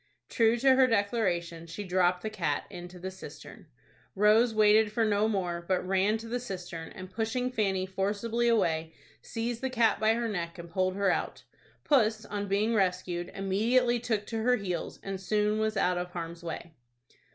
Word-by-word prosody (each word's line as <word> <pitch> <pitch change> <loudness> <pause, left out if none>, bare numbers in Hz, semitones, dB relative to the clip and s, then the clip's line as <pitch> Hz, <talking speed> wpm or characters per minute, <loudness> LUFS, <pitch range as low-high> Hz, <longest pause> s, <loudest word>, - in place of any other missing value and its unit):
True 230 0 +3
to 265 +2 +5
her 260 0 +5
declaration, 190 -7 0
she 165 +5 -6
dropped 180 -1 +1
the 220 - -2
cat 170 -9 -1
into 175 +1 -9
the 190 +2 -6
cistern. 190 - -11 0.5
Rose 215 +4 +5
waited 215 0 +4
for 225 +1 +1
no 210 0 +2
more, 180 -5 -2
but 185 -1 0
ran 195 +3 +2
to 225 +1 -9
the 245 +2 -2
cistern, 180 -7 -6
and, 185 0 -9
pushing 240 +4 -1
Fanny 195 -6 0
forcibly 205 +5 -1
away, 165 -8 +1 0.3
seized 230 +1 -4
the 265 - -1
cat 235 -4 +2
by 220 +1 +3
her 235 0 -1
neck, 170 -5 -4
and 170 -1 -9
pulled 185 +1 0
her 200 0 +2
out. - - -3 0.4
Puss, 220 -6 +2
on 205 0 -4
being 205 +4 +1
rescued, 180 -3 0
immediately 235 +6 +2
took 220 -3 -1
to 225 -1 -3
her 250 +2 +3
heels, 185 -6 -4
and 195 -1 -5
soon 210 +2 +1
was 220 -1 0
out 180 -2 +2
of 180 0 -4
harm's 170 -1 -6
way. 170 0 -6
205 Hz, 180 wpm, -29 LUFS, 180-225 Hz, 0.5 s, to